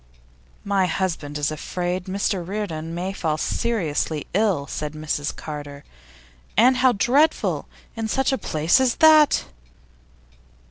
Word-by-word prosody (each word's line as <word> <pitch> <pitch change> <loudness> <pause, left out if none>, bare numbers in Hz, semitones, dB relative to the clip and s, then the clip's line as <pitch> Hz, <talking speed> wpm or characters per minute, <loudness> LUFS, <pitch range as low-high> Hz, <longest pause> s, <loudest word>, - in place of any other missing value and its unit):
'My 195 -2 +1
husband 160 -6 -2
is 150 +1 -1
afraid 180 +4 -3
Mr 195 -1 -1
Reardon 170 -4 -4
may 185 +3 -3
fall 160 -5 -1
seriously 160 -8 -1
ill,' 195 -7 +1
said 150 +2 -5
Mrs 155 -1 -3
Carter. 145 -2 -8 0.7
'And 250 +2 +5
how 255 -1 +4
dreadful! 275 +9 +2 0.3
In 225 -1 -3
such 265 +5 +1
a 265 - +1
place 160 - +2
as 255 -2 +2
that! 310 -2 +5
185 Hz, 125 wpm, -23 LUFS, 155-225 Hz, 0.7 s, And